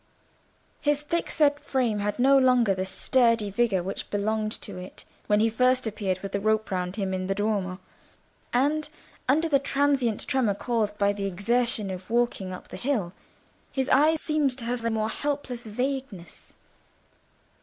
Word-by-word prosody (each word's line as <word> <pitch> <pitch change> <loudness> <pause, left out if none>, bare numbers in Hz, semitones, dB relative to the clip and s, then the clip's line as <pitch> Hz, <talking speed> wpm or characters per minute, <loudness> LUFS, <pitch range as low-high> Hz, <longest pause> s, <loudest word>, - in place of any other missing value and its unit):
His 295 0 +1
thickset 295 -2 +1
frame 245 -8 0
had 205 0 -2
no 270 +3 +5
longer 250 -6 +4
the 185 0 -3
sturdy 230 0 +2
vigour 200 -4 +1
which 195 - -5
belonged 215 +1 -1
to 200 - -7
it 180 +1 -10 0.2
when 210 0 +3
he 225 - +4
first 250 +3 +2
appeared 195 -4 -2
with 195 - -6
the 200 - -1
rope 215 +1 0
round 180 0 -2
him 195 -3 -2
in 185 0 -2
the 195 - 0
Duomo; 200 -3 -1 0.7
and 295 +5 +1 0.4
under 315 +5 +3
the 285 -3 +3
transient 275 -5 +1
tremor 245 -7 +1
caused 215 -2 -1
by 200 0 +2
the 200 -1 -4
exertion 215 +2 0
of 185 +1 -8
walking 235 -5 0
up 185 - -9
the - - -7
hill, 225 -10 -1 0.6
his 265 -1 -1
eyes 310 +4 +4
seemed 295 -5 +1
to 240 - -6
have 240 0 -2
a 230 - +1
more 220 -1 0
helpless 265 -3 -3
vagueness. 250 -6 -5
225 Hz, 165 wpm, -26 LUFS, 200-265 Hz, 0.7 s, no